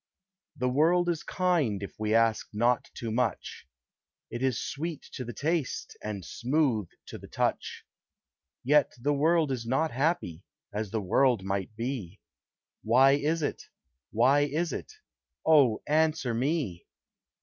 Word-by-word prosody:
The 125 -2 0
world 165 +7 +3
is 165 -3 -1
kind 160 - 0
if 100 - -7
we 110 0 +1
ask 115 -1 +2
not 120 +3 +1
too 115 -2 -4
much; 115 -3 -2 0.6
It 120 - -5
is 130 -3 +1
sweet 160 +1 -4
to 130 - -5
the 120 - -6
taste, 150 +5 -2
and 100 -4 -5
smooth 125 - 0 0.2
to - - -9
the - - -12
touch; - - -2 0.8
Yet 145 +2 +3
the 145 +5 +1
world 155 +1 +2
is 120 -3 -3
not 155 +6 +1
happy, 130 - -1 0.3
as 105 0 -3
the 110 +2 -2
world 115 +3 +2
might 95 +2 -3
be, 115 -6 -4 0.6
Why 130 +5 +5
is 150 +3 +1
it? - - -2 0.5
why 130 +6 +4
is 155 +4 0
it? - - -6 0.5
Oh, 140 -9 +4
answer 155 -5 +1
me! 130 - -2
130 Hz, 140 wpm, -28 LUFS, 110-155 Hz, 0.8 s, Why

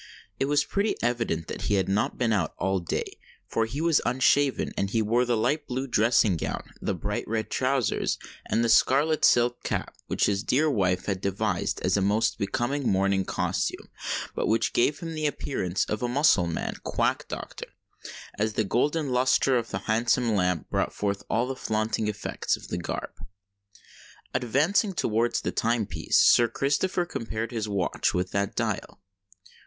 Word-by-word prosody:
It - - +2
was 145 +1 +2
pretty 205 +2 0
evident 115 -9 0
that - - -6
he 105 - +3
had 95 - +1
not 100 +2 0
been 115 -3 +1
out 95 -7 -1
all 95 0 0
day; 85 - -4 0.3
for 110 0 0
he 140 +7 -4
was 165 -2 +3
unshaven—and 130 -4 +1
he 115 - 0
wore 120 +4 +2
the 120 -1 +1
light 145 +7 0
blue 130 +2 -2
dressing 115 -5 +3
gown, - - -4
the - - -1
bright - - -3
red 110 0 -2
trousers, 130 -3 0 0.3
and 115 - +1
the - - +2
scarlet 145 +7 +3
silk 120 0 +3
cap, - - -3
which - - +1
his 100 -1 +1
dear 150 +7 +2
wife 90 -6 +1
had 95 -2 -2
devised 100 -1 -1
as - - +1
a - - +1
most 110 +4 +1
becoming 125 +6 -1
morning 95 0 +2
costume, - - -2 0.4
but - - -1
which 115 - +1
gave 145 +7 +2
him 165 -1 -5
the 155 -1 0
appearance 95 -11 -2
of 110 - -3
a 125 - 0
Mussulman 120 - +2
quack - - 0
doctor, - - -7 0.7
as 110 +1 0
the 110 - +1
golden 145 +7 0
lustre 130 +1 +3
of 115 -2 -1
the - - -5
handsome 115 +1 +2
lamp 90 -4 0
brought - - -1
forth 100 -1 -1
all 120 +2 +1
the 135 +1 -4
flaunting 110 -2 -1
effects 105 -1 -2
of - - -13
the - - -2
garb. 85 - -4 1.2
Advancing 155 - +1
towards 115 -1 +1
the - - -2
time 115 -1 0
piece, - - 0
Sir 120 - +6
Christopher 145 +9 0
compared 115 -6 -4
his 110 -3 -3
watch 100 -3 0
with 90 +1 -1
that 100 0 -1
dial. - - -3
115 Hz, 170 wpm, -26 LUFS, 100-135 Hz, 1.2 s, Sir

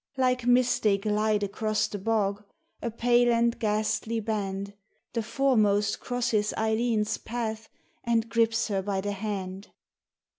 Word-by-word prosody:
Like 250 -2 +1
mist 250 0 +3
they 205 -2 +3
glide 210 0 0
across 215 +2 0
the 210 -1 -5
bog, 205 -1 0 0.4
a 235 - -2
pale 240 +1 +3
and 235 0 +2
ghastly 215 +1 0
band, 200 -2 -3 0.4
The 230 - 0
foremost 215 -4 +2
crosses 235 -4 -1
Eileen's 220 -1 0
path 220 -1 -4 0.3
and 230 -1 +1
grips 230 -1 +1
her 195 -2 0
by 195 0 -2
the 205 +1 -2
hand. 195 -1 -5
220 Hz, 135 wpm, -27 LUFS, 205-235 Hz, 0.4 s, mist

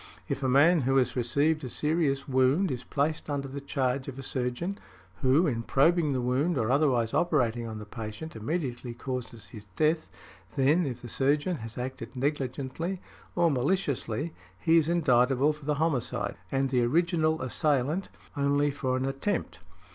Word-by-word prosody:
If - - -3
a 130 - +1
man 155 +6 +5
who 135 +1 +2
has 130 - +2
received 140 +6 +1
a 130 - -4
serious 150 -1 0
wound 135 +7 +3
is 125 -1 -4
placed 150 +4 -1
under 140 -1 -2
the 140 +1 -6
charge 130 -1 -1
of 135 -1 -6
a 135 - -6
surgeon 130 +10 -3 0.4
who, 135 +7 +4
in 120 -7 0
probing 155 +5 +3
the 130 -2 0
wound 135 +7 +1
or 115 -1 +1
otherwise 130 -5 +2
operating 120 -9 +1
on 110 -1 -6
the 105 - -8
patient, 110 +8 -7
immediately 125 -1 -3
causes 125 -3 -6
his 105 -3 -11
death; 155 +1 +1 0.5
then, 145 +4 +3
if 125 -2 -6
the - - -6
surgeon 145 +8 +1
has 115 -1 -8
acted 130 +2 -6
negligently, 140 +5 -2 0.4
or 170 -2 +3
maliciously, 145 - -1 0.3
he 165 - +5
is 160 0 0
indictable 135 -3 +3
for 150 -1 -14
the 150 0 +1
homicide, 135 -9 -1 0.2
and 135 -1 0
the 125 -2 +3
original 160 +4 +2
assailant 145 +6 0 0.3
only 145 +1 +2
for 130 -2 -1
an 130 - -1
attempt. 135 +10 -2
135 Hz, 165 wpm, -28 LUFS, 125-155 Hz, 0.5 s, man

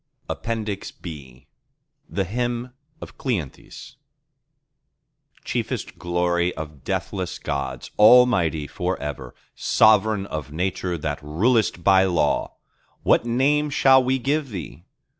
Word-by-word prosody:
(APPENDIX 110 -3 -4
B) 70 -7 -10 0.6
The 100 - -1
Hymn 120 +4 -3 0.3
of - - -11
Cleanthes 100 - -5 1.5
Chiefest - - -3
glory 85 0 0
of 75 -3 -8
deathless 95 -2 -3
Gods, 70 -3 -4
Almighty 105 -9 +5
for 90 +6 -3
ever, 75 -1 -6 0.2
Sovereign 110 -1 +3
of 75 -6 -6
Nature 90 +1 -2
that 75 -2 -4
rulest 90 +5 +1
by 95 0 +5
law, 85 -5 0 0.5
what - - +3
Name 145 +5 +2
shall 135 -2 +5
we 130 +1 +1
give 140 +2 -1
Thee? 85 - -8
95 Hz, 105 wpm, -23 LUFS, 80-120 Hz, 1.5 s, Almighty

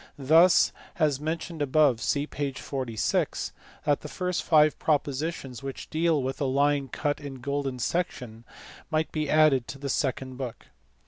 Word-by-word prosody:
Thus, 160 +6 +5 0.3
as 150 -5 +2
mentioned 160 +1 -4
above 140 -4 +3
(see 145 +4 0
p. 145 -2 -3
46), 130 -4 -2 0.3
the 145 0 +1
first 180 +3 -2
five 155 -2 +4
propositions 145 -3 -1
which 135 -1 -7
deal 160 -3 +2
with 135 +2 -4
a - - +2
line 140 +1 +2
cut 145 +3 -2
in 140 -2 -7
golden 135 0 -3
section 125 -5 -3 0.5
might 155 0 0
be 155 -2 -2
added 150 -5 +4
to 140 - -7
the 140 0 -5
second 130 -1 -2
book. 130 -3 -6
145 Hz, 145 wpm, -27 LUFS, 130-155 Hz, 0.5 s, Thus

